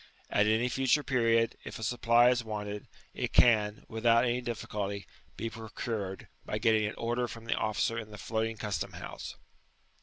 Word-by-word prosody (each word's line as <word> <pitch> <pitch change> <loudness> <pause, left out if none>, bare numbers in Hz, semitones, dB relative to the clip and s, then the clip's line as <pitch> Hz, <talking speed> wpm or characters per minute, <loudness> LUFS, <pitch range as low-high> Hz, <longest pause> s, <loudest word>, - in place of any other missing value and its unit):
At 105 +1 +4
any 110 +3 +3
future 135 +4 +2
period, 115 -4 +2
if - - -7
a 110 - -7
supply 120 +1 +4
is 120 -1 0
wanted, 105 -2 -5 0.3
it - - -3
can, 105 -3 +4
^ - - -24
without 115 +1 +3
any 125 0 +1
difficulty, 100 -4 -4 0.3
be 115 - -2
procured, 110 -3 -5 0.2
by - - -3
getting 110 -1 +3
an 105 - -5
order 120 +1 -1
from 115 -1 -9
the 115 - +1
officer 110 +1 0
in 110 -1 -7
the 105 - -9
floating 110 +1 -2
custom 105 -1 -3
house. - - -7
115 Hz, 175 wpm, -31 LUFS, 105-120 Hz, 0.3 s, At